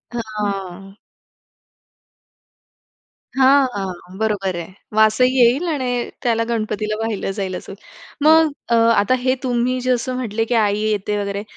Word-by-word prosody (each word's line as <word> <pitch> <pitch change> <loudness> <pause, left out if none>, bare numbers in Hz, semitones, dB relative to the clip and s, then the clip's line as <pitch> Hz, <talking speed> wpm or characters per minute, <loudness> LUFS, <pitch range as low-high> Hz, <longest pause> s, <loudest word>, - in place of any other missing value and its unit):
हां. 200 -4 -5 2.4
हां. 270 +1 +6
हां. 185 -2 -6
बरोबर 205 -4 -1
आहे. 170 +1 -8 0.2
वासही 250 +4 +3
येईल 250 +8 +4
आणि 245 -4 -2
त्याला 230 -2 +1
गणपतीला 215 -2 -2
वाहिलं 225 -3 -2
जाईल 195 -2 -4
असं. 180 - -8 0.5
मग 315 +1 +5 0.2
अ, - - +2
आता 230 -1 +3
हे 255 +1 +1
तुम्ही 250 0 0
जसं 255 0 -1
म्हटले 225 -3 -2
की 240 - -1
आई 210 -2 +2
येते, 210 -1 -1
वगैरे 200 0 -3
220 Hz, 125 wpm, -20 LUFS, 200-250 Hz, 2.4 s, हां